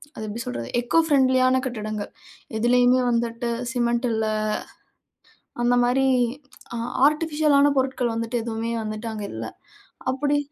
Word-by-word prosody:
அது 220 - -5
எப்படி 225 +3 -5
சொல்றது 120 -1 -5
எக்கோ 245 +7 +2
ஃப்ரெண்ட்லியான 260 -3 +3
கட்டிடங்க. 215 -3 -4 0.5
எதுலயுமே 245 +2 +4
வந்துட்டு 235 0 -1 0.2
சிமெண்ட் 240 0 +1
இல்ல. 220 0 0 1.4
அந்த 245 +1 +3
மாதிரி 265 +2 +2 0.7
அ - - -3 0.3
ஆர்டிபிஷியலான 300 -2 +2
பொருட்கள் 260 -3 0
வந்துட்டு, 230 +1 -2
எதுவுமே 230 0 -3
வந்துவிட்டு 215 +1 -4
அங்க 210 -1 -4
இல்லை. - - -5 0.6
அப்படி 290 +2 0
240 Hz, 120 wpm, -24 LUFS, 225-265 Hz, 1.4 s, எதுலயுமே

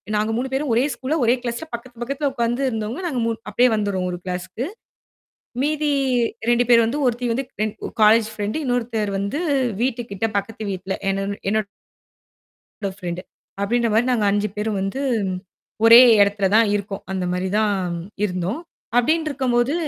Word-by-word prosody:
நாங்க 215 +1 +1
3 260 +2 -1
பேரும் 270 -1 -1
ஒரே 240 +3 +3
ஸ்கூல்ல, 260 +6 -2
ஒரே 235 - +5
கிளாஸ்ல, 240 +6 -4
பக்கத்து, 240 +1 -7
பக்கத்தல 275 +3 -1
உட்காந்து 240 +1 -1
இருந்தவங்க 225 - -3
நாங்க 260 -6 -2
3 230 -1 -1
அப்படியே 245 +4 +4
வந்துர்றோம் 200 -3 -1
ஒரு 175 - -4
கிளாஸ்க்கு. 185 +7 -4 1.0
மீதி 300 0 0 0.6
2 240 +1 +4
பேர் 235 -1 +7
வந்து, 255 +6 -1
ஒருத்தி 245 0 0
வந்து 265 +3 -1 0.2
ரெ - - +2 0.4
காலேஜ் 220 +1 +6
ஃப்ரெண்ட், 210 +3 -3
இன்னொருத்தர் 230 -4 -1
வந்து 200 - -2 0.4
வீட்டுக்கிட்ட 230 -5 -1
பக்கத்து 215 +2 -3
வீட்ல 190 0 -3 0.2
என்னோட 195 +1 -1 0.2
என்னோட 215 -2 -3 1.2
ஃப்ரெண்ட். 175 -1 -4 0.4
அப்படின்ற 235 +3 +1
மாரி 235 +3 +3
நாங்க 220 -4 +1
5 205 +1 +1
பேரும் 210 -1 -1
வந்து 195 +8 -3 0.9
ஒரே 230 +2 +11 0.2
இடத்துல 200 -1 +1
தான் 225 -2 +5
இருக்கோம். 200 0 -5
அந்த 185 -1 -2
மாரி 180 +1 -1
தான் 200 -4 +1 0.4
இருந்தோம். 185 - -3 0.4
அப்படின்னு 315 +6 +2
இருக்கும்போது 255 0 +1
225 Hz, 150 wpm, -22 LUFS, 200-245 Hz, 1.2 s, ஒரே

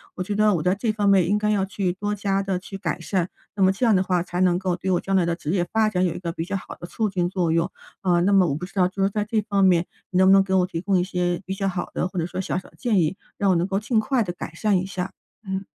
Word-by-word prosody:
我 185 - -3
觉 205 - -3
得 210 -1 +4
我 155 - -2
在 180 +2 +3
这 220 +2 0
方 210 -1 0
面 190 -4 +5
应 210 - +3
该 210 0 0
要 200 -2 +2
去 190 -2 -2
多 205 +2 -3
加 195 -1 0
地 195 -2 -1
去 195 +2 -8
改 170 -3 -2
善， 180 +1 -1 0.3
那 200 - -3
么 190 - +5
这 195 +6 -1
样 225 -3 +5
的 185 - +3
话， 180 -2 0
才 180 0 -3
能 180 -1 +3
够 185 -1 -1
对 185 +2 -4
我 180 - +2
将 195 0 -1
来 185 - +4
的 170 0 0
职 165 -3 -4
业 175 -2 +1
发 220 -1 +3
展 185 -3 0
有 170 - -1
一 - - -5
个 170 -2 -3
比 165 - -4
较 200 +2 -3
好 - - -9
的 175 - -7
促 220 +3 -1
进 180 -2 0
作 180 -3 0
用。 165 +2 +1 0.3
嗯， 175 -1 +3
那 200 - +3
么 190 -2 +5
我 140 - -1
不 180 - -5
知 190 - -14
道， 190 -2 +3
呃， 180 - +2
就 195 +1 -2
是 195 - +3
在 210 0 -1
这 215 +1 0
方 200 -2 +1
面， 180 -2 +4 0.2
你 180 - -1
能 185 0 +5
不 - - +7
能 195 0 +6
给 190 0 -3
我 180 -1 +4
提 165 -2 -5
供 190 0 +1
一 - - +1
些 180 -2 -1
比 190 - -3
较 195 0 -2
好 180 -2 -3
的， - - -1
或 185 - -9
者 165 - 0
说 185 +2 -4
小 185 - -2
小 185 - -6
的 - - -24
建 225 -6 +1
议， 165 +3 0 0.2
让 200 -1 +2
我 180 - +3
能 170 +2 +1
够 195 0 0
尽 220 +1 +1
快 250 +1 +1
地 175 -3 -4
改 175 - -7
善 205 0 +2
一 185 - -3
下， 190 0 -4 0.4
嗯。 190 0 -2
190 Hz, 360 characters per minute, -23 LUFS, 180-200 Hz, 0.4 s, 不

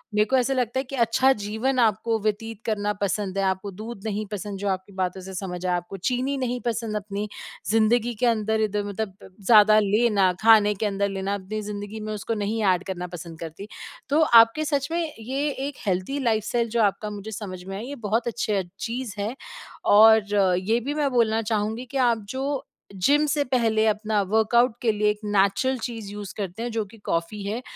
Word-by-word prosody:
मेरको 210 +5 +3
ऐसा 255 +2 +1
लगता 250 0 0
है - - -1
कि 275 +1 -7
अच्छा 260 +4 +3
जीवन 240 +5 -1
आपको 225 0 +2
व्यतीत 220 +1 -3
करना 210 -2 0
पसंद 195 -1 -1
है। 195 - +1
आपको 190 +1 -1
दूध 225 -3 -8
नहीं 215 0 -2
पसंद 205 -1 -5
जो 205 - -3
आपकी 190 +1 -4
बातों 185 0 -1
से 190 +1 -9
समझ 180 -1 -5
आया, 180 -1 +2
आपको 175 +3 -7
चीनी 260 +3 -1
नहीं 250 -1 -2
पसंद 225 -2 -2
अपनी 205 0 -3 0.4
ज़िंदगी 230 +2 +3
के 250 - +2
अंदर 220 -1 +1
इधर 210 -1 0
मतलब 205 -1 -4
प - - -12 0.2
ज़्यादा 215 -1 +7
लेना 205 -2 +3
खाने 215 -2 +6
के 215 - -2
अंदर 200 0 0
लेना 195 +1 -2
अपनी 205 +2 -5
ज़िंदगी 205 +1 -6
में 215 0 -4
उसको 210 +2 -3
नहीं 220 +2 -1
ऐड 180 +1 -3
करना 180 -1 -4
पसंद 170 -2 -9
करती। 165 +5 -8 0.4
तो 300 +3 +3 0.2
आपके 305 +7 -4
सच 285 -2 0
में 340 +1 0 0.2
ये 270 +6 -2 0.2
एक 285 - -7
हेल्थी 190 +10 -1
लाइफ़स्टाइल 230 +1 0
जो 230 0 +1
आपका 210 +1 +1
मुझे 210 +1 -7
समझ 185 -3 -6
में 195 +1 -7
आया 225 - -6
ये 285 - -6
बहुत 230 +3 0
अच्छा 210 -4 0 0.2
चीज़ 240 -2 -4
है। 220 +6 -2 0.5
और 215 0 +6 0.3
ये 220 +6 +1
भी 280 +5 -3
मैं 295 -2 +1
बोलना 225 -2 +2
चाहूँगी 220 +2 -2
कि 275 - -2
आप 235 -4 +2
जो 270 +1 -2 0.4
जिम 295 +2 +4
से 290 -1 +1
पहले 220 -3 +3
अपना 215 0 +1
वर्कआउट 230 +2 +3
के 230 -2 +3
लिए 210 0 +1
एक 210 0 -1
नेचुरल 205 +6 +2
चीज़ 225 -4 -5
यूज़ 205 -2 -7
करते 200 +3 -4
हैं 240 - -3
जो 220 -1 -1
कि 225 +3 -16
कॉफी 170 +5 -2
है 215 +5 -3
215 Hz, 200 wpm, -24 LUFS, 200-235 Hz, 0.5 s, ज़्यादा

